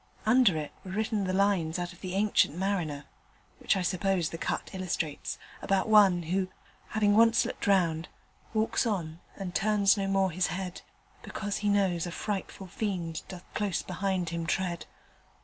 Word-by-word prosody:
Under 220 -6 +5
it 150 -1 -4
were 190 - -9
written 210 +1 -1
the 185 - -1
lines 190 -4 +2
out 175 0 -4
of 180 - -18
the 185 0 -4
"Ancient 200 -6 +2
Mariner" 175 -7 -1 0.5
(which - - +2
I 185 - -1
suppose 185 -2 +1
the 165 - -6
cut - - -3
illustrates) 175 -5 -3 0.2
about 195 +1 +1
one 200 -5 +6
who, 185 +3 0 0.4
having 205 -1 +2
once 230 +1 +5
looked - - -4
round 170 -4 +2 0.4
walks 220 +2 +1
on, 170 -6 -2 0.2
And 190 -3 -5
turns 205 0 +3
no 195 -1 -1
more 195 -1 +2
his 180 +2 +1
head, 180 -1 -5 0.4
Because 205 -1 -4
he 210 - 0
knows 190 -4 +2
a - - -5
frightful 195 0 -4
fiend 180 -4 -3
Doth 185 -1 -9
close 205 -4 -1
behind 185 -1 -1
him 165 0 -3
tread. 175 -1 -1
190 Hz, 165 wpm, -29 LUFS, 175-205 Hz, 0.5 s, one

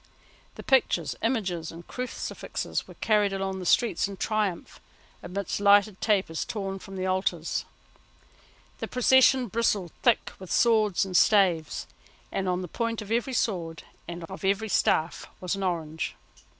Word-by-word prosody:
The - - -9
pictures, 265 -2 +2
images 190 -9 -1
and 170 +1 -11
crucifixes 250 0 -4
were - - -12
carried 210 -2 +2
along 195 0 -2
the 180 - -4
streets 235 -1 +3
in 200 -1 -8
triumph, 210 -5 -2 0.4
amidst 185 +2 -4
lighted 205 0 +4
tapers 195 -7 +1
torn 195 -3 -4
from 195 +1 -10
the 185 0 -2
altars. 185 +1 -1 1.1
The - - -3
procession 260 0 +4
bristled 205 -5 0
thick 240 -3 +2
with 185 -2 -9
swords 215 -5 +3
and 185 -1 -6
staves, 180 -7 +3 0.5
and 190 -1 -1
on 180 0 -1
the - - -5
point 230 +4 -2
of 210 - -10
every 240 +3 0
sword 170 -9 -1 0.2
and 170 0 -6
of 190 +4 -9
every 200 +3 +1
staff 165 -3 +1
was 180 - -2
an 195 - -5
orange. 160 -4 -2
195 Hz, 150 wpm, -27 LUFS, 180-220 Hz, 1.1 s, lighted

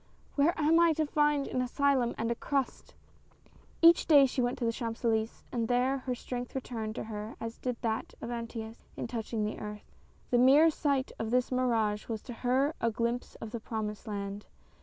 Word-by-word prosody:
" - - -32
Where 300 +4 +2
am 315 +2 +4
I 340 -1 +5
to 310 0 0
find 295 -1 +2
an 255 - -1
asylum 255 -1 +1
and 230 +1 -1
a - - 0
crust! 275 +2 -3 0.4
" - - -29
Each 335 0 +7
day 285 -4 +8
she 255 0 -1
went 245 0 0
to 235 -2 0
Champs 230 0 -5
Elys^es, 225 -1 0
and 230 -2 -1
there 255 +3 +2
her 255 -1 -3
strength 245 +1 -6
returned 225 -4 -4
to - - -4
her 215 0 -6
as 230 0 -6
did 250 -2 -2
that 220 -1 -2
of 235 - -5
Anteus 230 -1 -6
in - - -3
touch 230 -2 -5
ing 220 -2 0
the 210 - -4
earth; 210 0 -8 0.4
the 245 - +4
mere 285 +6 +7
sight 280 -3 0
of 225 - -2
this 250 +2 +1
mirage 225 -5 +1
was 220 -2 -4
to 245 - -7
her 260 +5 +1
a 230 - +3
glimpse 235 +2 -2
of 225 - -8
the 235 - -4
promised 215 -2 -5
land. 200 -1 -5
240 Hz, 205 wpm, -30 LUFS, 225-270 Hz, 0.4 s, day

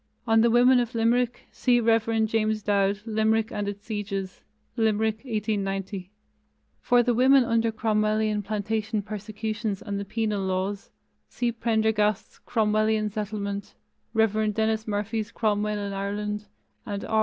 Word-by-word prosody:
On 225 -1 +4
the 235 - +4
women 245 +2 +5
of 240 0 -2
Limerick, 240 +2 +1
see 245 -2 +2
Rev. 225 -1 +2
James 220 -1 0
Dowd, 200 0 +1
Limerick 220 0 +1
and 205 -1 -3
its 205 +1 -6
Sieges 200 -3 -4 0.3
(Limerick, 220 -1 +1
1890). 200 -5 -3 0.7
For 245 0 +3
the 245 0 +2
women 260 +3 +5
under 230 -1 +1
Cromwellian 215 -1 +1
Plantation 215 +1 -2
persecutions 215 0 -4
and 200 -1 -4
the - - -3
Penal 215 -1 -1
Laws, 190 +1 -2 0.4
see 240 -1 -1
Prendergast's 220 -3 0
Cromwellian 215 -1 +1
Settlement, 200 -1 -4 0.4
Rev. 215 -1 +2
Denis 220 0 0
Murphy's 215 +1 -2
Cromwell 210 -1 0
in 200 -1 -4
Ireland, 210 +1 -3 0.4
and 200 -1 -5
R. 220 - +1
215 Hz, 130 wpm, -26 LUFS, 205-225 Hz, 0.7 s, women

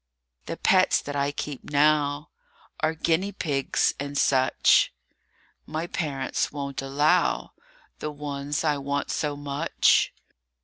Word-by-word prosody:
THE - - -4
pets - - +4
that 145 - -6
I 140 0 0
keep 145 -1 -6
now 145 0 +2 0.5
Are 155 +1 0
guinea 170 +5 0
pigs 140 -8 0
and 145 0 -4
such; 130 -2 +3 0.8
My 160 +2 -3
parents 145 -6 -2
won't 140 -2 -4
allow 135 - +1 0.5
The 150 - -3
ones 145 0 -4
I 150 -2 +1
want 140 +1 -2
so 150 -1 -1
much. 145 +2 +2
145 Hz, 120 wpm, -26 LUFS, 140-150 Hz, 0.8 s, pets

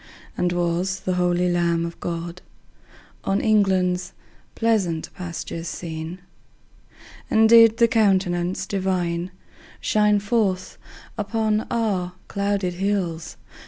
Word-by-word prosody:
And 180 - 0
was 175 +2 -1
the 185 - -1
holy 180 0 +1
Lamb 170 -1 +1
of 170 - -7
God 170 +1 -5 0.8
On 195 +1 +1
England's 185 -4 +2 0.4
pleasant 195 -8 0
pastures 170 -1 -6
seen? 160 0 -5 1.1
And 220 0 +5
did 230 -1 +7
the 235 - +5
Countenance 190 -5 +1
Divine 180 -3 -1 0.5
Shine 210 -1 +3
forth 200 -3 -1 0.4
upon 215 +1 0
our 200 -6 -1
clouded 200 -2 -1
hills? 175 -4 -2
185 Hz, 100 wpm, -23 LUFS, 175-210 Hz, 1.1 s, did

